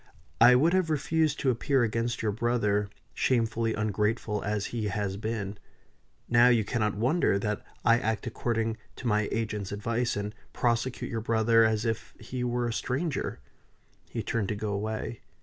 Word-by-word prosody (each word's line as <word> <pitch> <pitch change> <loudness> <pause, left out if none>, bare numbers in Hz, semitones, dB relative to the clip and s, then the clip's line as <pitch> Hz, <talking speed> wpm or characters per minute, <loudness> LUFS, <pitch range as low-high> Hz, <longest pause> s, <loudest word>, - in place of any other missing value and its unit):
I 125 +2 +9
would 160 +7 +4
have 185 -3 +2
refused 155 0 +1
to 130 - +3
appear 130 +2 +1
against 115 +1 -1
your 110 - +1
brother, 105 -2 +1 0.2
shamefully 115 -2 +1
ungrateful 105 0 -1
as 105 -1 -1
he 115 -3 -1
has 100 -1 -2
been. 105 -1 -4 0.7
Now 120 +1 +6
you 115 -4 +4
cannot 105 -1 0
wonder 125 - +2
that 105 +1 -2 0.2
I 115 0 +5
act 110 -1 -1
according 115 -1 -1 0.2
to - - -10
my 105 -2 +2
agent's 105 -3 -2
advice, 115 +4 -1
and 105 +1 -3 0.2
prosecute 120 +1 0
your 115 -1 -2
brother 115 0 +4
as 110 0 +1
if 115 -2 -3
he 125 +3 -4
were 120 0 0
a 115 - -2
stranger." 135 +6 -2 0.7
He - - -3
turned 115 -4 -1
to 105 - -2
go 105 0 -3
away. 105 - -3
115 Hz, 165 wpm, -28 LUFS, 105-120 Hz, 0.7 s, I